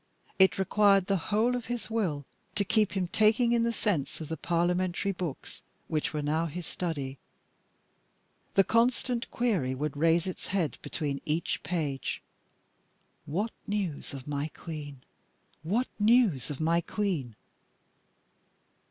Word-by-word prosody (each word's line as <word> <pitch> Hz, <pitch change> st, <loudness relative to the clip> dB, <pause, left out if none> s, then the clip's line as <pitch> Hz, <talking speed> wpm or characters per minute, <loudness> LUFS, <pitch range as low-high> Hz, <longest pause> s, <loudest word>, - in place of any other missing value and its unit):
It 190 Hz, 0 st, +6 dB
required 195 Hz, 0 st, +4 dB
the 195 Hz, -, +1 dB
whole 225 Hz, +4 st, +3 dB
of 245 Hz, -2 st, -4 dB
his 230 Hz, -4 st, -4 dB
will 170 Hz, -11 st, 0 dB, 0.3 s
to 205 Hz, -1 st, +2 dB
keep 215 Hz, +1 st, +2 dB
him 190 Hz, -3 st, 0 dB
taking 220 Hz, +4 st, +4 dB
in 235 Hz, -1 st, +3 dB
the 235 Hz, 0 st, +2 dB
sense 200 Hz, -11 st, -1 dB
of 155 Hz, -, -6 dB
the 160 Hz, -, -1 dB
Parliamentary 175 Hz, +3 st, 0 dB
books 175 Hz, -6 st, -5 dB, 0.3 s
which 155 Hz, -1 st, -1 dB
were 150 Hz, -2 st, -2 dB
now 160 Hz, +3 st, +1 dB
his 170 Hz, +2 st, -6 dB
study. 140 Hz, -7 st, -3 dB, 1.4 s
The 195 Hz, -, +7 dB
constant 235 Hz, +2 st, +1 dB
query 190 Hz, -, 0 dB
would 150 Hz, +2 st, -2 dB
raise 165 Hz, +3 st, +3 dB
its 185 Hz, -, -5 dB
head 185 Hz, -5 st, -1 dB
between 145 Hz, -4 st, -3 dB
each 155 Hz, +2 st, -1 dB
page 145 Hz, -4 st, -2 dB, 1.0 s
"What 200 Hz, +10 st, -1 dB, 0.2 s
news 190 Hz, -9 st, -2 dB
of 130 Hz, 0 st, -9 dB
my 145 Hz, 0 st, -1 dB
Queen? 145 Hz, -5 st, -7 dB, 0.6 s
what 210 Hz, +11 st, +1 dB
news 210 Hz, -, +4 dB
of 145 Hz, -, -5 dB
my 165 Hz, +2 st, +2 dB
Queen?" 170 Hz, -, -2 dB
180 Hz, 135 wpm, -29 LUFS, 150-210 Hz, 1.4 s, The